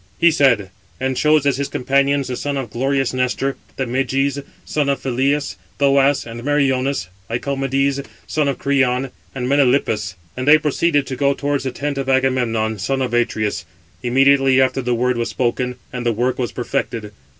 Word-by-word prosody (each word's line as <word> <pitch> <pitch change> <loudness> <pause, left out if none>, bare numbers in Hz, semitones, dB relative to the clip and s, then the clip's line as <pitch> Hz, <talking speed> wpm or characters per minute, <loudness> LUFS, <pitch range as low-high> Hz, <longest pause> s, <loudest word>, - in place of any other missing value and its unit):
He 170 - +5
said, 125 - +2 0.3
and 130 0 -1
chose 150 +1 +3
as 140 -2 +2
his 140 0 -1
companions 140 +1 +1
the 125 - -3
sons 145 +2 -3
of 125 -5 -4
glorious 135 +2 0
Nestor, 130 +2 0 0.2
and 130 -3 -2
Meges, 135 +2 0 0.2
son 145 -2 0
of 140 - 0
Phyleus, 135 0 0 0.2
Thoas, 140 0 +3
and 120 0 -8
Meriones, 135 -7 +1 0.2
Lycomedes, 135 +2 0 0.2
son 150 -2 0
of 140 - -1
Creon, 130 -2 +1 0.2
and 125 -2 -2
Melanippus; 125 -8 +2 0.2
and 130 +2 -4
they 150 +1 +8
proceeded 150 -1 +1
to 130 - -4
go 140 +1 +1
towards 145 -1 -1
the 130 - -1
tent 140 +2 -3
of 135 -1 -3
Agamemnon, 120 -5 +1
son 135 +7 -1
of 125 - -3
Atreus. 110 -5 0 0.4
Immediately 135 +1 +4
after 130 0 +2
the 125 -1 0
word 125 +1 +1
was 115 0 -1
spoken, 125 0 -1 0.2
and 125 -1 -4
the 120 - +2
work 125 +4 -1
was 125 - -1
perfected. 120 -4 -3
135 Hz, 170 wpm, -19 LUFS, 125-140 Hz, 0.4 s, they